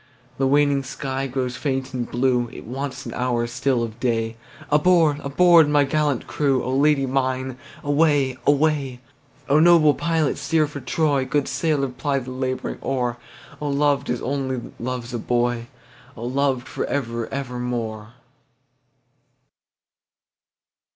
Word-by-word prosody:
The 135 Hz, -, +3 dB
waning 145 Hz, 0 st, +3 dB
sky 135 Hz, 0 st, -4 dB
grows 125 Hz, -1 st, -3 dB
faint 135 Hz, -2 st, -2 dB
and 125 Hz, -2 st, -3 dB
blue, 125 Hz, -1 st, +1 dB
It -, -, -10 dB
wants 135 Hz, +3 st, -5 dB
an -, -, -6 dB
hour 125 Hz, -2 st, 0 dB
still 120 Hz, +1 st, 0 dB
of 115 Hz, 0 st, -6 dB
day, 115 Hz, -2 st, -1 dB, 0.4 s
Aboard! 155 Hz, -1 st, +4 dB
aboard! 160 Hz, +2 st, +5 dB
my 145 Hz, -1 st, +4 dB
gallant 145 Hz, -2 st, 0 dB
crew,O 130 Hz, -3 st, 0 dB
Lady 140 Hz, 0 st, +3 dB
mine 130 Hz, -1 st, -1 dB, 0.2 s
away! 145 Hz, -3 st, +2 dB
away!O 140 Hz, -1 st, 0 dB
noble 160 Hz, -2 st, +6 dB
pilot 165 Hz, -3 st, 0 dB
steer 155 Hz, +3 st, +2 dB
for 145 Hz, -1 st, -7 dB
Troy, 140 Hz, +2 st, +1 dB
Good 135 Hz, +2 st, 0 dB
sailor 140 Hz, 0 st, 0 dB
ply 140 Hz, +2 st, -2 dB
the 130 Hz, -1 st, -5 dB
labouring 130 Hz, 0 st, -3 dB
oar,O 130 Hz, +3 st, -4 dB
loved 140 Hz, 0 st, +1 dB
as 125 Hz, 0 st, -2 dB
only 130 Hz, -2 st, -3 dB
loves 125 Hz, 0 st, -4 dB
a 120 Hz, -, -2 dB
boy!O 120 Hz, 0 st, -4 dB
loved 130 Hz, 0 st, 0 dB
for -, -, -4 dB
ever 115 Hz, -4 st, -2 dB
evermore! 120 Hz, -4 st, -4 dB
135 Hz, 125 wpm, -23 LUFS, 125-145 Hz, 0.4 s, noble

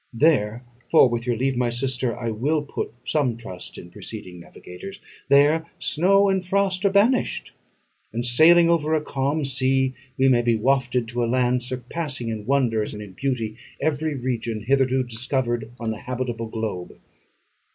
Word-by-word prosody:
There 120 Hz, -4 st, +2 dB, 0.2 s
for 160 Hz, -, +7 dB
with 120 Hz, 0 st, -3 dB
your 120 Hz, -2 st, +1 dB
leave, 130 Hz, +2 st, 0 dB
my 120 Hz, -1 st, +1 dB
sister, 125 Hz, -1 st, -2 dB
I 115 Hz, -2 st, -3 dB
will 145 Hz, +8 st, 0 dB
put 145 Hz, -, -4 dB
some 130 Hz, -7 st, 0 dB
trust 95 Hz, -6 st, -8 dB
in 90 Hz, -, -11 dB
preceding 90 Hz, -3 st, -9 dB
navigators 90 Hz, -, -10 dB, 0.3 s
there 145 Hz, +4 st, +4 dB
snow 195 Hz, +5 st, +3 dB
and 190 Hz, -1 st, +1 dB
frost 190 Hz, 0 st, 0 dB
are -, -, +6 dB
banished; 215 Hz, +6 st, +2 dB, 0.6 s
and, 120 Hz, +2 st, -3 dB
sailing 165 Hz, +8 st, +6 dB
over 160 Hz, -2 st, +2 dB
a 155 Hz, -, 0 dB
calm 140 Hz, +2 st, -1 dB
sea, 130 Hz, 0 st, +1 dB, 0.2 s
we 135 Hz, -, +4 dB
may 125 Hz, -2 st, +4 dB
be 120 Hz, -1 st, +2 dB
wafted 125 Hz, 0 st, +1 dB
to 120 Hz, 0 st, -1 dB
a 115 Hz, -, 0 dB
land 125 Hz, 0 st, +2 dB
surpassing 130 Hz, +1 st, -3 dB
in 110 Hz, -1 st, -5 dB
wonders 120 Hz, -6 st, +1 dB
and 105 Hz, -, -7 dB
in 100 Hz, -, -11 dB
beauty 115 Hz, -2 st, -2 dB, 0.2 s
every 155 Hz, 0 st, -1 dB
region 120 Hz, -4 st, -3 dB
hitherto 130 Hz, +1 st, +2 dB
discovered 120 Hz, -1 st, -2 dB
on 115 Hz, -2 st, -2 dB
the 110 Hz, -, -6 dB
habitable 120 Hz, -2 st, -3 dB
globe. 110 Hz, -5 st, -5 dB
130 Hz, 160 wpm, -23 LUFS, 115-145 Hz, 0.6 s, for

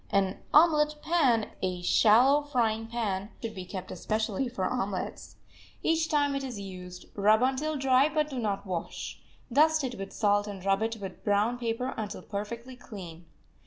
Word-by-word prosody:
An 195 Hz, -1 st, +1 dB
"omelet 300 Hz, -1 st, +5 dB
pan," 265 Hz, -10 st, +2 dB
a 180 Hz, -1 st, -2 dB
shallow 245 Hz, +10 st, +5 dB
frying 230 Hz, -6 st, 0 dB
pan, 210 Hz, -4 st, -2 dB
should 225 Hz, -2 st, -5 dB
be 185 Hz, -3 st, -7 dB
kept 185 Hz, 0 st, -7 dB
especially 220 Hz, +3 st, -1 dB
for 195 Hz, -6 st, -2 dB
omelets. 200 Hz, -6 st, -3 dB, 0.5 s
Each 325 Hz, -1 st, +2 dB
time 290 Hz, -2 st, +2 dB
it 275 Hz, 0 st, -2 dB
is 250 Hz, -6 st, -5 dB
used 180 Hz, -2 st, -8 dB
rub 215 Hz, +3 st, +4 dB
until 285 Hz, +4 st, 0 dB
dry, 270 Hz, +1 st, +4 dB
but 305 Hz, -1 st, +1 dB
do 260 Hz, -, -3 dB
not 205 Hz, -3 st, -2 dB
wash. 180 Hz, -3 st, -5 dB, 0.3 s
Dust 310 Hz, +2 st, +4 dB
it 255 Hz, -2 st, -2 dB
with 195 Hz, 0 st, -6 dB
salt 205 Hz, -1 st, +2 dB
and 195 Hz, -2 st, -7 dB
rub 195 Hz, +1 st, +2 dB
it 225 Hz, 0 st, -1 dB
with 195 Hz, -3 st, -8 dB
brown 210 Hz, +4 st, +1 dB
paper 240 Hz, +2 st, -2 dB
until 210 Hz, -2 st, -5 dB
perfectly 235 Hz, +5 st, -6 dB
clean. 175 Hz, -9 st, -10 dB
225 Hz, 165 wpm, -29 LUFS, 200-265 Hz, 0.5 s, omelet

